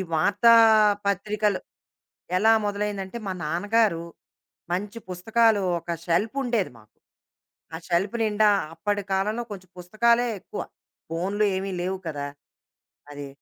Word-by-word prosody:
ఈ - - 0
వార్తా 205 +8 +5 0.5
పత్రికలు 205 +1 0 0.8
ఎలా 220 +4 +5
మొదలైందంటే, 205 0 -3
మా 190 - -1
నాన్నగారు, 205 -1 +1 0.7
మంచి 205 +5 -3
పుస్తకాలు 220 +4 +2 0.2
ఒక 170 - -16 0.2
షెల్ఫుండేది 220 +4 0
మాకు. 105 -1 -24 0.8
ఆ - - -3
షెల్ఫ్ 190 +6 +1
నిండా 215 0 +3 0.3
అప్పటి 205 +4 -1
కాలంలో 210 +5 0
కొంచెం 185 -2 -9
పుస్తకాలే 235 +7 +2
ఎక్కువ. - - -6 0.5
ఫోనులు 190 +6 0
ఏమి 195 +1 -3
లేవు 190 +2 -2
కదా! 145 -2 -4 0.8
అది. 145 -1 -7
200 Hz, 110 wpm, -25 LUFS, 180-215 Hz, 0.8 s, వార్తా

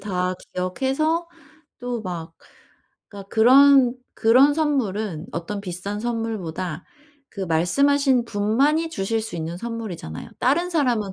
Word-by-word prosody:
다 185 -2 -2 0.2
기억해서 270 - -1 0.5
또 245 -1 -3
막 165 -3 -6 0.7
그러니까 200 -1 -11
그런 260 +3 +6 0.2
그런 255 +6 +5
선물은 215 - -1
어떤 200 +4 -4
비싼 200 +2 -5
선물보다 195 -8 -4 0.5
그 195 - -6
말씀하신 255 - +2
분만이 265 +10 +1
주실 220 -4 -2
수 195 -6 -6
있는 165 +1 -4
선물이잖아요. 220 - -6
다른 340 +8 +2
사람은 240 - 0
220 Hz, 270 characters per minute, -23 LUFS, 185-270 Hz, 0.7 s, 그런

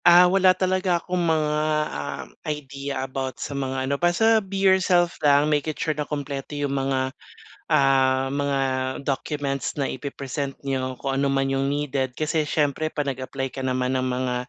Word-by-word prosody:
Ah, 175 +1 +9
wala 185 0 +4
talaga 185 -1 +1
akong 180 +1 -2
mga, 155 -2 +2 0.4
ah, 75 -1 -4 0.2
idea 140 -2 -4
about 130 0 -4
sa - - -5
mga 135 -1 -2
ano, 140 +1 -2
basta 220 +6 +4
be 195 0 -6
yourself 190 -3 +4
lang, 145 0 +5
make 150 0 +1
it 155 - -4
sure 155 - 0
na 150 0 -4
kumpleto 145 0 -4
yung 145 -1 -1
mga, 135 -1 0 0.6
ah, 135 -1 +3
mga 140 0 0 0.4
documents 140 -1 -2
na 135 - 0
ipe-present 140 +1 -4
niyo 130 -2 -2
kung 135 -1 -1
ano 140 - +1
man 135 0 +1
yung 135 0 0
needed. 135 -3 -1
Kasi 155 +2 0
syempre 150 +1 0
'pag 145 -2 -1
nag-apply 135 0 -4
ka 135 0 -5
naman 130 0 0
ng 130 - 0
mga, 125 0 -1
140 Hz, 170 wpm, -24 LUFS, 135-155 Hz, 0.6 s, Ah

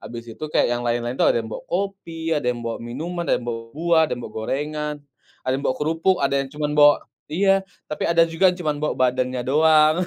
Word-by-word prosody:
Habis 115 +1 -8
itu 135 - -7
kayak - - +2
yang 120 - -4
lain-lain 120 0 0
tuh - - +4
ada - - +2
yang 110 - -9
bawa - - -6
kopi, 175 -4 -3
ada 145 -4 -2
yang 120 - -4
bawa 115 -1 -3
minuman, 160 +9 -4
ada - - +3
yang 120 - -10
bawa 115 -1 -3
buah, 165 +1 +3
ada - - -5
yang 120 - -8
bawa - - -9
gorengan, 150 +6 -3 0.5
ada 130 - 0
yang 135 - -3
bawa 130 - 0
kerupuk, 165 +5 +1
ada 140 0 +1
yang 135 - -7
cuma 150 0 -2
bawa 145 0 +7 0.4
iya, 195 +4 +3 0.3
tapi 150 - -3
ada 170 0 +5
juga 180 +3 +3
yang 180 - -8
cuma 155 -2 +1
bawa 150 - -1 0.2
badannya 125 0 -2
doang. 155 +2 +5
150 Hz, 235 wpm, -22 LUFS, 125-165 Hz, 0.5 s, bawa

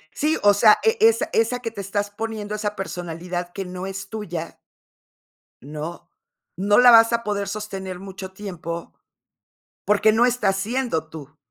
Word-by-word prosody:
Sí, 310 +2 +1
o 205 - +7
sea, 210 +1 +6
e 450 +1 +3
esa 450 +1 +4
esa 230 +2 +1
que 230 -2 -5
te 200 -3 -6
estás 205 +1 -3
poniendo, 215 -1 -5
esa 210 0 -3
personalidad 175 -1 -5
que 195 +1 -5
no 185 +1 -6
es 195 0 -7
tuya. 175 -7 -6 1.0
¿No?, 155 +5 -7 0.5
no 205 +2 +2
la 245 0 +8
vas 230 0 +7
a 235 0 0
poder 200 -1 -2
sostener 195 -4 -5
mucho 190 -1 -8
tiempo, 175 -4 -7 0.9
porque 210 +1 +4
no 235 +3 +4
estás 215 -6 +1
siendo 210 -6 -2
tú. 155 -2 -11
200 Hz, 155 wpm, -23 LUFS, 180-225 Hz, 1.0 s, la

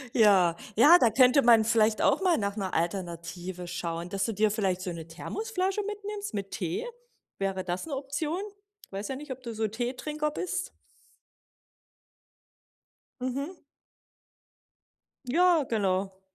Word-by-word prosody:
Ja, 195 -7 +5 0.2
ja, 300 +10 +8
da 230 - +4
könnte 255 +3 +5
man 230 -2 +7
vielleicht 220 -1 +2
auch - - +3
mal 360 -3 +3
nach 200 0 -2
'ner 190 -2 -3
Alternative 175 0 -3
schauen, 170 0 -4
dass 195 0 -1
du 225 - -1
dir 215 +2 +3
vielleicht 190 -4 0
so 185 -2 -3
'ne 165 -1 -7
Thermosflasche 390 - -2
mitnimmst 415 - -5
mit 195 -1 -4
Tee. 175 - -3 0.5
Wäre 195 -1 -2
das 180 - -3
'ne 290 -4 -4
Option? 290 +6 -3 0.5
Weiß 200 +3 -5
ja 265 - -2
nicht, 285 0 -8
ob 260 0 -7
du 235 -1 -5
so 220 0 -1
Teetrinker 265 +7 -3
bist? 360 +4 -3 2.5
Mhm. 280 +7 -4 1.6
Ja, 335 +2 +4
genau. 195 -3 0
220 Hz, 135 wpm, -28 LUFS, 190-295 Hz, 2.5 s, ja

